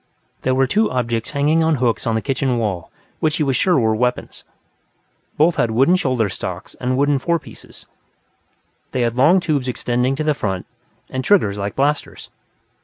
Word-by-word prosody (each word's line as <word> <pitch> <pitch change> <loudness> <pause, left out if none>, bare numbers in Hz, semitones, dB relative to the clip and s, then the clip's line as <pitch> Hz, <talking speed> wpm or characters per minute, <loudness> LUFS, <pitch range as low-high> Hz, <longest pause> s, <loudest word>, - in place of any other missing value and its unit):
There 130 0 +1
were 135 0 +3
two 215 +9 +1
objects 120 -2 -2
hanging 150 +3 +2
on 160 -1 +2
hooks 120 -4 0
on 115 - +1
the 110 - -1
kitchen 135 -2 0
wall 100 -7 -2 0.3
which 155 -1 +1
he 155 - +1
was 135 -2 0
sure 180 +1 +3
were 110 -3 +2
weapons. 125 +2 -2 0.9
Both 160 +3 +3
had 115 - +2
wooden 135 +11 +3
shoulder 130 - 0
stocks, 95 - -6
and 130 +1 0
wooden 140 0 +2
fore 170 +5 +1
pieces; - - -13 1.1
they 130 - 0
had 120 -1 0
long 155 +9 +5
tubes 150 -7 -1
extending 125 +1 0
to 155 - -2
the 155 0 +2
front, 95 -8 -3 0.4
and 130 0 -4
triggers 115 - +2
like 100 0 -3
blasters. 145 +2 -2
130 Hz, 180 wpm, -20 LUFS, 115-150 Hz, 1.1 s, long